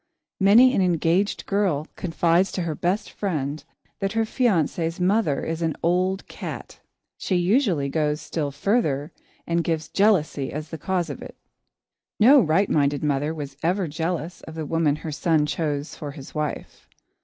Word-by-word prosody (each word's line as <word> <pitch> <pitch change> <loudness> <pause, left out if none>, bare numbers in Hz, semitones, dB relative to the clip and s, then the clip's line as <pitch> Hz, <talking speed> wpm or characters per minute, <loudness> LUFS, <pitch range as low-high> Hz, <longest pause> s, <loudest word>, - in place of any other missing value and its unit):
Many 225 +7 +6
an 195 - +2
engaged 180 +2 +1
girl 190 -8 0
confides 170 +1 +1
to 185 - -2
her 165 -2 -2
best 180 +7 -1
friend 155 -7 -3 0.4
that 195 +1 -1
her 225 0 +2
fiancé's 175 - 0
mother 185 -4 +1
is 165 +1 -3
"an 160 -2 0
old 185 +3 +1
cat." - - -8 0.4
She 190 - -1
usually 180 - +2
goes 150 +1 0
still 150 -1 -3
further, 150 - 0 0.3
and 170 0 0
gives 160 -2 -2
jealousy 185 -9 +2
as 150 +2 -6
the 160 - -7
cause 175 -1 -1
of 140 - -8
it. - - -10 0.8
No 270 +7 +8
right 190 +2 +2
minded 145 -1 +1
mother 145 +1 0
was 145 -4 -6
ever 180 +2 0
jealous 165 +2 -3
of 160 - -10
the 160 -1 -4
woman 160 -1 +1
her 155 +1 -6
son 150 +1 +1
chose 150 -1 -2
for 150 - -7
his 140 -3 -11
wife. 150 -2 -5
165 Hz, 160 wpm, -24 LUFS, 150-190 Hz, 0.8 s, No